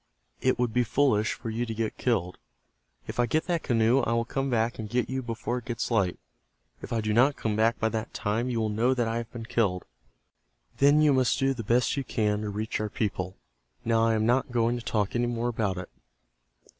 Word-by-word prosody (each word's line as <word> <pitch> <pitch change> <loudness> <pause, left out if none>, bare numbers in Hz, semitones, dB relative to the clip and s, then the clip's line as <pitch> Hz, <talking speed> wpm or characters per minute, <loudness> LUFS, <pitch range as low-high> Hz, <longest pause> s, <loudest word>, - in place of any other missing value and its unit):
It 130 - +2
would 120 -2 0
be 125 - +3
foolish 115 -3 +2
for 115 - -6
you 115 +2 -1
to 115 -2 -4
get 110 0 -2
killed. 95 -8 0 0.7
If - - -7
I 120 - +3
get 155 +7 0
that 175 -2 0
canoe 115 +1 +3
I 115 - 0
will 115 0 +1
come 135 +3 -2
back 115 -1 0
and 110 -1 -5
get 125 +2 -1
you 130 0 -1
before 120 +1 -3
it 120 - -17
gets 120 +1 -3
light. 100 -6 +1 0.6
If - - -8
I 115 - 0
do 105 0 -1
not 130 +5 +4
come 110 -2 -2
back 115 +2 +2
by 110 - +1
that 110 -1 -4
time 115 +3 -1
you 120 -2 -1
will 110 - 0
know 115 +5 +2
that 120 -2 0
I 115 +1 -1
have 115 -1 -5
been 115 -2 -7
killed. 100 -6 0 0.9
Then 145 +2 +5
you 150 -2 +5
must 130 -2 +2
do 135 0 +2
the 115 -3 -6
best 120 +6 +2
you 140 - 0
can 105 -4 0
to 105 - -3
reach 105 +2 -3
our 105 0 -2
people. 95 -4 -3 0.5
Now 115 0 +3
I 115 0 +3
am 110 0 +1
not 125 +3 +2
going 120 0 +2
to 120 - -5
talk 105 -2 -1
any 120 0 +1
more 120 0 -1
about 105 -5 -1
it. 90 - -6
115 Hz, 230 wpm, -27 LUFS, 110-125 Hz, 0.9 s, Then